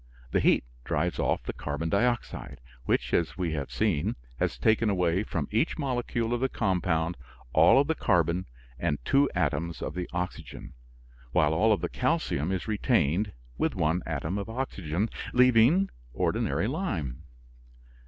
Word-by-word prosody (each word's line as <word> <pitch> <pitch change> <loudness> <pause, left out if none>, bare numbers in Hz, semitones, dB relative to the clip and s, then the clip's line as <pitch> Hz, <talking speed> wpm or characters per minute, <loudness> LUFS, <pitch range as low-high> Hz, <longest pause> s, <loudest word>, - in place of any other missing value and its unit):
The - - +3
heat - - +4 0.2
drives 80 +7 -1
off - - +1
the - - -4
carbon 75 +3 -3
dioxide, 120 - -1 0.3
which, 60 0 0
as 85 -2 +1
we 90 -3 -1
have 70 -3 -3
seen, 105 -1 0 0.2
has - - 0
taken 110 - +3
away 90 -2 +2
from 85 -9 -3
each 115 +9 +1
molecule 120 -5 -1
of 120 - 0
the 130 - +2
compound 90 -6 0 0.4
all - - +6
of 140 - +3
the 160 - +1
carbon 90 - +1 0.3
and 75 -4 0
two 140 0 +4
atoms 80 0 -1
of - - -4
the 90 -1 -4
oxygen, 90 -6 -5 0.6
while 75 0 +3
all 110 +8 +3
of 105 - +2
the - - 0
calcium 75 +6 0
is 95 +1 -2
retained 105 - +1 0.3
with - - +1
one 80 +4 +1
atom 90 +6 -2
of 100 - -5
oxygen, 105 - -2 0.3
leaving 125 +9 +5 0.3
ordinary 95 - 0
lime. 100 - -3
95 Hz, 155 wpm, -28 LUFS, 80-115 Hz, 0.6 s, all